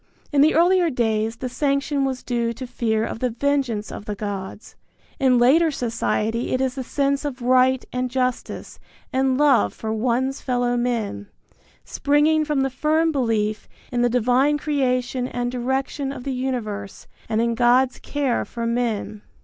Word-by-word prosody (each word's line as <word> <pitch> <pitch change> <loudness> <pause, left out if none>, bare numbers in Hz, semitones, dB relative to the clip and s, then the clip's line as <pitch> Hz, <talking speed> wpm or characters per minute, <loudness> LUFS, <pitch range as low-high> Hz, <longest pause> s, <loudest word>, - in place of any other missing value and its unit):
In 285 -2 +4
the 310 +2 +4
earlier 350 +1 +4
days 225 -4 0
the 255 - -5
sanction 280 +2 0
was 260 -2 -3
due 235 -1 -1
to 255 +3 -7
fear 225 -3 -1
of - - -5
the 250 - 0
vengeance 245 -3 -1
of 205 - -8
the 210 -1 -4
gods. 200 0 -6 0.4
In 260 -2 +4
later 290 +8 +5
society 230 -3 -1
it - - -1
is 260 -1 0
the 265 - -4
sense 280 +2 0
of 265 -4 -5
right 255 +1 +3
and 250 0 -1
justice 255 -1 -3 0.3
and 260 0 +2
love 275 - +3
for 220 0 -4
one's 255 +4 0
fellow 245 -1 0
men, 230 - -2 0.6
springing 295 - +2
from 295 -2 0
the 270 0 0
firm 310 +5 +1
belief 220 -6 -1 0.2
in 245 -1 0
the 245 - +3
divine 250 +5 +2
creation 255 -4 -1
and 245 -1 -3
direction 265 +2 -2
of 265 -3 -7
the 270 - -3
universe 225 -6 -4 0.2
and 220 -1 +1
in 235 0 +1
God's 245 +2 +3
care 280 -4 -1
for 235 -1 -5
men. 230 -3 -2
250 Hz, 165 wpm, -22 LUFS, 230-275 Hz, 0.6 s, later